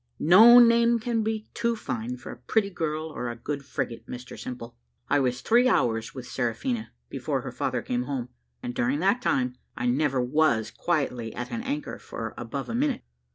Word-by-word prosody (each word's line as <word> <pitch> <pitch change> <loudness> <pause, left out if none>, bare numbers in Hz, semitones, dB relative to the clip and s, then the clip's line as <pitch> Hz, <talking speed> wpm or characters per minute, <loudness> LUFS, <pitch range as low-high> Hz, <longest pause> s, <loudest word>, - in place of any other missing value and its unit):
"No 220 +9 +8
name 235 0 +6
can 230 0 -1
be 220 0 -2
too 235 0 0
fine 125 - -4
for - - -9
a - - -8
pretty 200 - 0
girl 155 -3 -2
or 125 -5 -4
a 120 - -5
good 140 +4 -5
frigate, 125 -4 -4
Mr 125 0 -8
Simple. 120 -2 -7 0.3
I 145 - +3
was 125 -2 0
three 240 - +4
hours 115 - +1
with 130 -2 -7
Seraphina 175 - -2 0.2
before - - -2
her - - -6
father - - -2
came 250 -1 -1
home, 125 -3 -3 0.3
and 120 - -3
during 125 +3 +1
that 200 +7 +2
time 125 - 0 0.2
I - - -2
never 135 +2 +2
was 125 -3 +2
quietly 125 -9 -2
at 125 - -5
an 230 - -3
anchor 285 +4 -4
for - - -6
above - - -5
a 235 - -4
minute. 270 +1 0
150 Hz, 190 wpm, -26 LUFS, -, 0.3 s, No